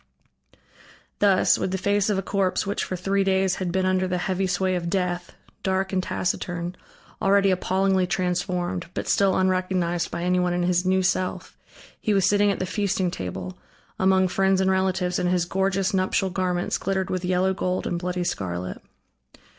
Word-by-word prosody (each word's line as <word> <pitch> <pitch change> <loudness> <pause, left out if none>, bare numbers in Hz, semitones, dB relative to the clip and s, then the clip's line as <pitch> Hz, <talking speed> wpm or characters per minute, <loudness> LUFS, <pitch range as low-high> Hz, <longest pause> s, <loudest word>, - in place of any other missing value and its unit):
Thus, 200 -2 +4
with - - -1
the 190 - -1
face 200 +2 +1
of 205 - +1
a 195 - -1
corpse 190 -1 0
which 200 +1 -2
for 185 - -3
three 195 +2 0
days 190 -1 +1
had 185 -2 -2
been 190 +1 0
under 185 0 +1
the 180 0 -1
heavy 185 +1 -1
sway 185 +1 0
of 175 -2 -2
death, 180 -1 -2 0.3
dark 190 0 -1
and 185 - +2
taciturn, 175 -1 -3 0.5
already 195 0 +4
appallingly 190 0 +1
transformed, 180 -1 -1
but - - -3
still 195 -2 +3
unrecognized 185 -2 0
by 170 - -4
anyone 180 0 +1
in 175 - 0
his 180 +1 +1
new 190 0 +2
self, 185 0 -1 0.4
he 215 -3 0
was 190 -2 +3
sitting 205 +1 +3
at 200 - 0
the 185 - -2
feasting 190 -2 -1
table, 90 - -6 0.4
among 190 0 +4
friends 190 +1 +2
and 190 0 +2
relatives, 190 -1 0
and 180 - +1
his 180 -1 +1
gorgeous 195 +2 0
nuptial 190 0 +1
garments 180 -1 -1
glittered 190 -1 -1
with 185 -1 -2
yellow 185 +1 +1
gold 185 0 -2
and 175 - -2
bloody 180 0 -2
scarlet. 90 - -4
185 Hz, 175 wpm, -24 LUFS, 180-190 Hz, 0.5 s, Thus